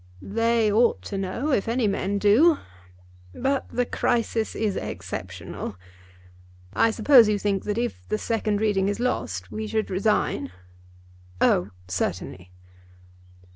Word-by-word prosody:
"They 230 +1 +1
ought 230 +3 +3
to 200 - -5
know, 235 +10 -2
if 215 -6 +1
any 230 0 +1
men 200 0 -1
do; 245 +11 +5 0.8
but 270 +1 -1
the 245 - 0
crisis 230 -2 -1
is 210 -3 -1
exceptional. - - -6 1.0
I 230 - +3
suppose 230 0 +6
you 210 - +2
think 200 -1 -1
that 210 +1 -2
if 240 0 -3
the 215 - 0
second 215 -2 -1
reading 200 -3 +2
is 205 - -3
lost 95 - -2
we 215 0 -4
should 220 -1 -2
resign?" 185 - 0 0.9
"Oh, 90 +2 +3 0.2
certainly." 90 0 -4
215 Hz, 130 wpm, -25 LUFS, 195-230 Hz, 1.0 s, suppose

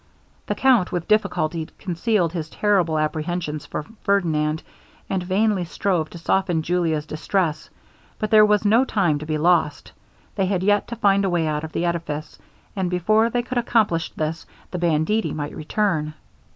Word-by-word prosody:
The - - -1
Count 250 -9 +3
with 175 -2 -3
difficulty 165 -6 +1
concealed 180 -1 0
his 160 -3 -4
terrible 185 -7 +1
apprehensions 155 0 -2
for 150 - -4 0.2
Ferdinand, 160 -6 +1 0.5
and 190 -1 0
vainly 195 +1 +1
strove 170 -2 -1
to - - -10
soften 175 -1 0
Julia's 165 -3 0
distress. 155 +1 -2 0.5
But 215 -2 -3
there 215 -1 +8
was 210 0 +3
no 225 +5 +5
time 175 - +1
to 155 - -8
be 155 -1 0
lost 160 -2 +1 0.4
they 195 -2 0
had 185 -1 0
yet 205 0 +2
to 235 - -5
find 200 -3 +3
a 195 - +1
way 175 -2 +1
out 150 0 -1
of 160 - -6
the 170 - -1
edifice, 155 -3 -3 0.4
and 190 -3 -1
before 215 +6 +2
they 240 +1 -1
could 250 0 -2
accomplish 215 -8 +1
this, 160 +2 -3 0.2
the 180 - -3
banditti 170 +6 +1
might 145 -1 -5
return. 155 -3 -1
175 Hz, 165 wpm, -22 LUFS, 155-205 Hz, 0.5 s, there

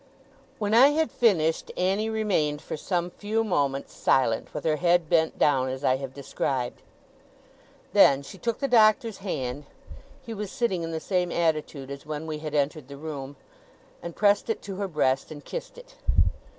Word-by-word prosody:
When 210 -1 -1
I 245 +4 +8
had 310 +2 +1
finished, 165 -9 +2
Annie 195 +4 +1
remained, 190 -10 0
for - - -6
some 175 +2 -2
few 215 +4 -1
moments, 140 -9 -1
silent, 115 -4 +1
with - - -6
her 155 -1 +2
head 175 -1 +3
bent 160 -1 +2
down, 130 -3 +3
as 130 +2 -5
I 130 -1 +3
have 135 -1 -6
described. 130 -2 -3 1.1
Then, 140 0 +6
she 190 +7 -11
took 235 -2 -1
the 275 - -1
Doctor's 220 -3 +4
hand 140 -8 -4 0.6
(he 230 - -6
was 210 -2 -5
sitting 195 -8 0
in 165 - -3
the 160 - -2
same 180 0 -1
attitude 155 -4 -1
as 140 0 -7
when 150 +1 -5
we 155 -1 -4
had 155 -1 -5
entered 145 -1 0
the 140 0 -9
room), 145 -2 -6 0.7
and 170 -1 -7
pressed 205 +1 +3
it 225 - -2
to 195 -2 -6
her 200 0 -2
breast, 135 -6 0
and 150 -2 -10
kissed - - -6
it. - - -14
165 Hz, 175 wpm, -26 LUFS, 140-205 Hz, 1.1 s, I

